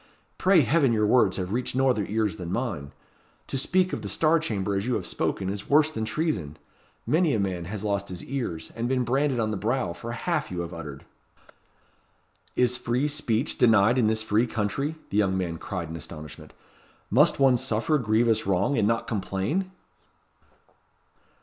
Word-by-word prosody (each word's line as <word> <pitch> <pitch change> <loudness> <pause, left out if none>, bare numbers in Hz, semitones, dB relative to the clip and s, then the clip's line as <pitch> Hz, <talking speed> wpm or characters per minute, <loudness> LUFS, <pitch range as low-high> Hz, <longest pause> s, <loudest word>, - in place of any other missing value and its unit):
"Pray 185 -3 +5
heaven 140 0 +3
your 105 -1 +2
words 120 +4 +3
have 95 -1 -3
reached 125 +1 -2
no 135 +1 +3
other 110 -6 +1
ears 105 -4 -1
than 90 -2 -6
mine! 95 - -3 0.5
To - - -6
speak 185 +7 +1
of - - -3
the - - -5
Star 165 +1 +3
Chamber 100 -10 -2
as 100 +3 -1
you 125 - +1
have - - -3
spoken 95 - -2
is 100 +1 -4
worse 150 +2 +4
than 110 -7 -3
treason. 110 - -2 0.5
Many 155 +2 +2
a - - 0
man 90 -3 -2
has 105 +3 -5
lost 100 -1 -1
his 90 -1 -7
ears, 120 -12 -4
and 115 +1 -2
been 130 -1 +1
branded 135 +1 +1
on 110 -1 0
the 105 - -2
brow, 110 -2 -1
for 115 +7 -7
half 155 +4 -2
you 90 -1 -3
have 85 +1 -6
uttered." 75 -4 -8 1.5
"Is 125 0 +2
free 125 +3 0
speech 145 -4 -1
denied 115 +1 +5
in 115 - +3
this 110 0 +1
free 110 +3 +2
country?" 120 +8 -2 0.2
the 100 - 0
young 95 -3 +2
man 85 -3 -3
cried 90 -4 -5
in 80 - -6
astonishment. 75 -2 -9 0.6
"Must - - +4
one 135 -2 +5
suffer 120 +7 +1
grievous 110 -2 +2
wrong, 100 +8 +1
and 105 - +3
not 115 +1 0
complain?" 110 - -2
110 Hz, 180 wpm, -26 LUFS, 95-130 Hz, 1.5 s, Pray